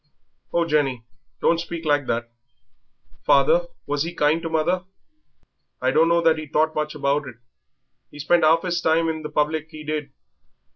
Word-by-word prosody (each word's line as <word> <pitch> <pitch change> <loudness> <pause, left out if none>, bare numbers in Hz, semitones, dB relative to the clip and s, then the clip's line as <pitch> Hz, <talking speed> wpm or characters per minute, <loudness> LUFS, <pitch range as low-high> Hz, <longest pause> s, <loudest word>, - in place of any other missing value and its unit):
"Oh, 170 0 +1
Jenny, 140 -6 0 0.4
don't 165 - +3
speak 170 -1 -6
like 145 -3 +1
that! 115 0 -2 0.9
Father, - - +3 0.2
was 145 0 -2
he 170 +3 -3
kind 150 +2 +2
to 165 - -4
mother?" 175 +3 0 0.9
"I - - +1
dunno 170 +2 +3
that 160 -1 +3
he 155 - -7
thought 155 +2 +1
much 150 0 -3
about 140 +1 0
it; 125 - -9 0.7
he - - -14
spent 170 +4 +2
'alf 165 +3 +4
'is 175 -1 -1
time 165 0 +2
in 160 -1 -3
the 150 - -6
public, 155 +1 -1
'e 155 -1 -9
did. 150 -2 -4
155 Hz, 165 wpm, -23 LUFS, 150-165 Hz, 0.9 s, alf